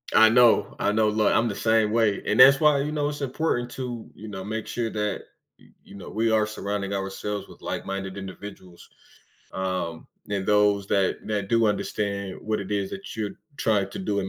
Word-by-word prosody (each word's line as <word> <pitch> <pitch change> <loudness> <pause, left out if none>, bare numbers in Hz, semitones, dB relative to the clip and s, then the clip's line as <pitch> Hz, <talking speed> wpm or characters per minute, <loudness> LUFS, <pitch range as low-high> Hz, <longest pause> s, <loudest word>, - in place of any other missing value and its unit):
I 110 0 +8
know, 120 0 +4
I - - +2
know, 110 0 +3
loo 105 0 +1
I'm 115 +1 +3
the 105 - -3
same 110 -1 +2
way, 110 -3 +2
and 105 - 0
that's 135 +1 +9
why, 150 -3 +4
you 150 - -2
know, 150 -1 0
it's 145 -1 -6
important 130 -2 -1
to, 120 -3 -6
you 110 - -10
know, 95 -2 -6
make 110 +2 -4
sure 115 -2 -2
that, 105 -2 -2 0.4
y - - -20 0.2
you 100 - -14
know, 100 - -9
we 115 +1 0
are 110 -1 +3
surrounding 100 -2 -3
ourselves 100 +1 -4
with - - -16
like-minded 95 0 -4
individuals. 95 -2 -10 0.6
Um, 95 -3 -3 0.2
and 100 -2 -2
those 105 -1 +3
that 95 -2 +1
that 105 -2 -2
do 115 -1 +3
understand 100 -2 -2
what 110 -1 -2
it 100 +1 -7
is 100 -2 -1
that 195 0 -8
you're 105 -2 -3 0.2
trying 105 -3 +1
to - - -7
do 100 +1 -1
in 95 - -4
105 Hz, 200 wpm, -25 LUFS, 100-115 Hz, 0.6 s, that's